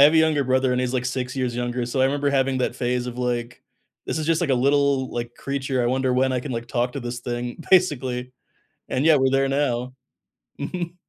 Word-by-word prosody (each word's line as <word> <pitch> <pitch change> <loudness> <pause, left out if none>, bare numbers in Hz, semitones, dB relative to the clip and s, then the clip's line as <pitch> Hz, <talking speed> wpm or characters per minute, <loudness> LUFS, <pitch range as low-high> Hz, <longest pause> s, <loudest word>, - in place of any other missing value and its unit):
have 150 - +8
a 165 - +3
younger 160 -3 +4
brother 130 0 +2
and 125 - +1
he's, 125 0 -1
like, 125 -1 -1
6 125 0 -3
years 125 -2 -1
younger, 120 0 -2
so, 125 +2 -1
I - - +5
remember 140 +1 +1
having 135 -1 +1
that 125 -1 -1
phase 125 0 -1
of 125 0 -6
like, 120 -1 -3 0.4
"this - - -2
is 155 - -2
just, 165 -1 +2
like, 170 -5 0
a - - +4
little, 140 0 +2
like, 120 0 -4
creature, 135 -2 -2
I - - +1
wonder 130 +1 +1
when 130 +1 +2
I 125 - 0
can, 140 - -6
like, 115 0 -4
talk 125 0 -1
to 140 - -4
this 120 0 -5
thing," 120 +4 -4
basically. 130 -9 +2 0.6
And 130 - 0
yeah, 160 -2 +6
we're 130 -1 +3
there 135 0 +2
now. 130 -3 0 0.7
Mhm. 175 -1 -4
130 Hz, 235 wpm, -23 LUFS, 125-140 Hz, 0.7 s, have